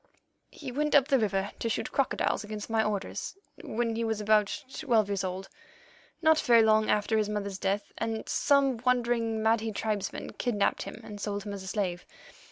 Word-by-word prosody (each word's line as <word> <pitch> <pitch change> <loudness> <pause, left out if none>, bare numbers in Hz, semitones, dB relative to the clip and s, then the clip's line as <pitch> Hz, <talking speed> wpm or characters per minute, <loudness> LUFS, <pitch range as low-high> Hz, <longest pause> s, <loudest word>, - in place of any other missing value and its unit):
"He 275 -4 -8
went 300 +3 0
up 280 0 +5
the 270 -2 +4
river 200 -2 0
to 230 - -1
shoot - - -2
crocodiles 275 -4 0
against 210 +1 -6
my 220 -1 +3
orders, 210 - -3 0.3
when 230 0 -1
he 230 - -1
was 220 -1 -1
about 210 -1 +2 0.2
twelve 230 -9 +2
years 200 -1 -1
old—not 195 - -3
very 235 -2 +5
long 215 0 +4
after 215 +1 +2
his 210 -1 0
mother's 200 -2 -3
death, 200 +1 -1
and 225 -1 -3
some 280 -3 +3
wandering 235 -2 +1
Mahdi 225 0 +2
tribesmen 210 -2 -3
kidnapped 215 -5 +1
him 195 - -7
and 205 -1 -9
sold 205 -1 -3
him 205 - -5
as 200 - -6
a 190 - -9
slave. 185 -3 -2
220 Hz, 175 wpm, -29 LUFS, 205-235 Hz, 0.3 s, up